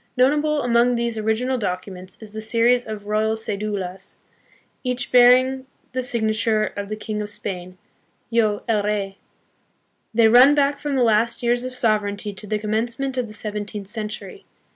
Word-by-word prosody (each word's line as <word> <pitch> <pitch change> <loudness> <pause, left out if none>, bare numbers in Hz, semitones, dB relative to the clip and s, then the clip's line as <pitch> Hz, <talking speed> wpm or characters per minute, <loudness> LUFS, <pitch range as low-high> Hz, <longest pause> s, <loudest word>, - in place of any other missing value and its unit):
Notable 295 +4 +2
among 240 +1 +3
these 235 -1 -1
original 235 +4 0
documents 185 -2 -5
is 220 -2 -12
the 220 +1 -6
series 235 +2 +2
of 215 -2 -6
Royal 215 +1 0
Ce"dulas, 200 -3 -4 0.7
each 250 -1 -2
bearing 255 +2 +5 0.2
the 255 - -2
signature 220 -2 0
of 200 0 -5
the 215 - -3
King 215 0 -4
of 210 - -4
Spain, 185 -3 -6 0.3
" - - -43
Yo, 215 -3 +1
el 220 -3 +2
Rey." 200 -1 -2 0.9
They 225 0 +4
run 250 +6 +7
back 285 0 +2
from 290 -2 -2
the 255 - +3
last 230 +2 +2
years 240 +1 +1
of 255 - -3
sovereignty 210 -4 -1
to 210 +2 -7
the 215 - 0
commencement 230 +5 -2
of 250 -2 -1
the 215 - -11
seven 210 -1 -4
teenth 205 0 -7
century. 220 - -6
220 Hz, 165 wpm, -22 LUFS, 210-245 Hz, 0.9 s, run